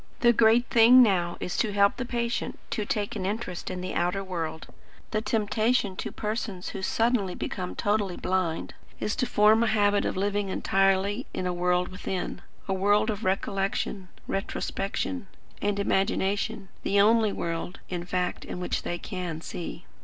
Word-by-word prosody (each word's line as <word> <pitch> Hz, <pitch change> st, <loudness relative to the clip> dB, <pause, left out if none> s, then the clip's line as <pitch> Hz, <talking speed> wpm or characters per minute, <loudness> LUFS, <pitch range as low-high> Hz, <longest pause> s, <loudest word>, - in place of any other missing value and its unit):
The 240 Hz, 0 st, +6 dB
great 230 Hz, +2 st, +5 dB
thing 240 Hz, +2 st, +7 dB
now 175 Hz, -6 st, +1 dB
is 180 Hz, -, -3 dB
to 220 Hz, -, +1 dB
help 200 Hz, 0 st, +4 dB
the 255 Hz, -, -2 dB
patient 235 Hz, -1 st, -2 dB
to 215 Hz, -3 st, -1 dB
take 205 Hz, 0 st, -2 dB
an -, -, -3 dB
interest 195 Hz, -2 st, -3 dB
in 185 Hz, -1 st, -4 dB
the 185 Hz, -, -4 dB
outer 180 Hz, +3 st, 0 dB
world. 165 Hz, -4 st, -4 dB, 0.5 s
The 215 Hz, -, 0 dB
temptation 215 Hz, -1 st, +1 dB
to -, -, -4 dB
persons 210 Hz, -4 st, -3 dB
who -, -, -6 dB
suddenly 220 Hz, -2 st, +1 dB
become 180 Hz, -1 st, -4 dB
totally 205 Hz, -3 st, 0 dB
blind, 185 Hz, -3 st, -1 dB, 0.3 s
is 210 Hz, -, -1 dB
to 250 Hz, -, 0 dB
form 215 Hz, +2 st, +5 dB
a 235 Hz, -, +3 dB
habit 205 Hz, -1 st, +3 dB
of -, -, -2 dB
living 200 Hz, 0 st, 0 dB
entirely 195 Hz, +4 st, +1 dB
in 185 Hz, -, -2 dB
a 180 Hz, -, 0 dB
world 180 Hz, 0 st, +1 dB
within; 185 Hz, 0 st, -4 dB, 0.3 s
a 195 Hz, -, 0 dB
world 205 Hz, +3 st, +3 dB
of 210 Hz, +1 st, -5 dB
recollection, 195 Hz, 0 st, -1 dB, 0.2 s
retrospection, 195 Hz, +4 st, -3 dB, 0.3 s
and 205 Hz, 0 st, 0 dB
imagination; 195 Hz, -1 st, 0 dB
the 200 Hz, -, +2 dB
only 220 Hz, +1 st, +5 dB
world, 170 Hz, 0 st, -3 dB
in 175 Hz, -2 st, -4 dB
fact, 180 Hz, 0 st, -2 dB
in -, -, -6 dB
which 180 Hz, -, -1 dB
they 175 Hz, -, -3 dB
can 180 Hz, -5 st, -5 dB
see." 170 Hz, +1 st, -7 dB
200 Hz, 165 wpm, -27 LUFS, 185-215 Hz, 0.5 s, thing